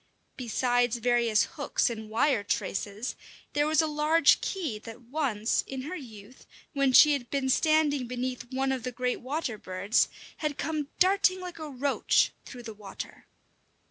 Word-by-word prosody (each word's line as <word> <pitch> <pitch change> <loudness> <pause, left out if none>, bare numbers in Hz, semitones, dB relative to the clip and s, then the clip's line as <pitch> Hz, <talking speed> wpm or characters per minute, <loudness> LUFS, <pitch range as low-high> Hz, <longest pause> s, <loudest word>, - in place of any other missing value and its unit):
Besides 245 -1 +1
various 235 -2 +3
hooks 285 - -1
and 220 -3 -5
wire 225 0 +2
traces, 205 +3 -3 0.4
there 295 0 +2
was 315 +1 +3
a - - +1
large 305 +2 +4
key 315 - -3
that 225 +2 -11
once, 240 -4 0
in 265 -1 -5
her 330 +7 -5
youth, 230 - -12 0.3
when 275 -2 +2
she 300 +3 +8
had 245 -4 -3
been 275 -2 -1
standing 295 -2 +2
beneath 250 0 -4
one 265 +1 0
of 260 -1 -2
the 250 - -4
great 250 +1 -2
water 260 -4 -3
birds, 195 +5 +1 0.3
had 300 -2 -3
come 305 -2 -2
darting 375 0 +3
like 360 -2 -8
a 310 -1 -6
roach 280 +1 +2
through 245 -2 -10
the 220 -1 -7
water. 205 -2 -9
260 Hz, 160 wpm, -28 LUFS, 235-300 Hz, 0.4 s, she